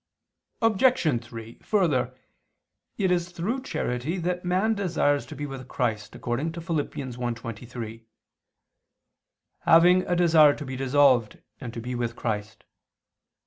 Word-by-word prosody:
Obj. 215 - +3
3: 115 0 -10
Further, 135 - +1 0.8
it 190 -3 +1
is 175 -1 +1
through 190 +10 -3
charity 145 - -2
that 180 0 -2
man 185 +5 +1
desires 165 -8 0
to - - -8
be 145 - -4
with 135 -2 -7
Christ 110 -5 -2
according 135 +7 -2
to 170 - -6
Phil. 165 -1 -2
1:23: 120 -4 -5 1.5
"Having 180 +3 +5
a 175 - +1
desire 160 -4 +6
to 150 - -7
be 130 0 -5
dissolved 130 -4 +3 0.2
and 125 -4 -6
to - - -4
be 125 +2 -5
with 120 -1 -2
Christ." 105 -2 -4
145 Hz, 130 wpm, -26 LUFS, 120-175 Hz, 1.5 s, desire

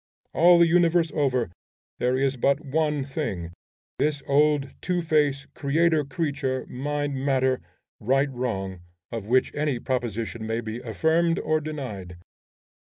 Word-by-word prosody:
All 175 +1 +6
the 170 - +6
universe 170 -1 +3
over, 130 - +1 0.5
there 125 +1 +1
is 135 0 +1
but 140 +3 +2
one 150 0 0
thing, 100 - -4 0.5
this 145 -1 0
old 145 0 +2
Two 180 -1 -1
Face, 145 -3 +1
creator 160 +2 +2
creature, 140 -2 -2
mind 145 +2 -3
matter, 130 -1 +1 0.4
right 135 +5 +1
wrong, 95 -8 -3 0.3
of 115 -3 -5
which 130 +3 +2
any 145 -3 0
proposition 115 -3 -3
may 115 +1 -1
be 110 0 -5
affirmed 160 +8 +1
or 155 0 0
denied. 125 - -6
140 Hz, 130 wpm, -25 LUFS, 125-155 Hz, 0.5 s, All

